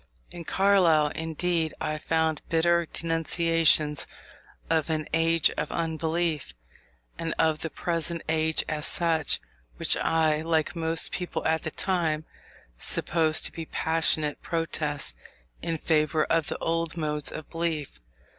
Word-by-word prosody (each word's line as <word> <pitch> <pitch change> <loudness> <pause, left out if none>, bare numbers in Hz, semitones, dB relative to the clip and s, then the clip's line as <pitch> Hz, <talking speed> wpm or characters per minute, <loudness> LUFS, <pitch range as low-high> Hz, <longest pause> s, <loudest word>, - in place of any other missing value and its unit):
In 170 -1 -8
Carlyle, 175 -7 +4
indeed, 160 +1 -1
I 155 0 -2
found 160 -1 0
bitter 170 +1 +3
denunciations 165 -2 +1 0.6
of 160 -1 +1
an 155 -1 -1
"age 165 -1 +3
of - - -3
unbelief," 165 -1 -1 0.6
and 165 -1 -2
of 160 -1 +2
the 165 - -4
present 170 0 -2
age 160 0 +1
as 150 0 -1
such, 165 -3 +2 0.4
which - - +4
I, 155 -2 +2
like 160 0 0
most 165 0 0
people 180 -2 -3
at 160 0 +2
that 160 - -6
time, 160 -5 0 0.5
supposed 160 - +1
to - - -3
be 165 -2 -7
passionate 160 -2 +1
protests 155 - -2 0.5
in 165 -1 -2
favour 155 0 +2
of 165 -2 +1
the - - -3
old 165 0 -2
modes 150 -2 0
of 155 - -7
belief. 165 - -3
160 Hz, 130 wpm, -27 LUFS, 155-165 Hz, 0.6 s, Carlyle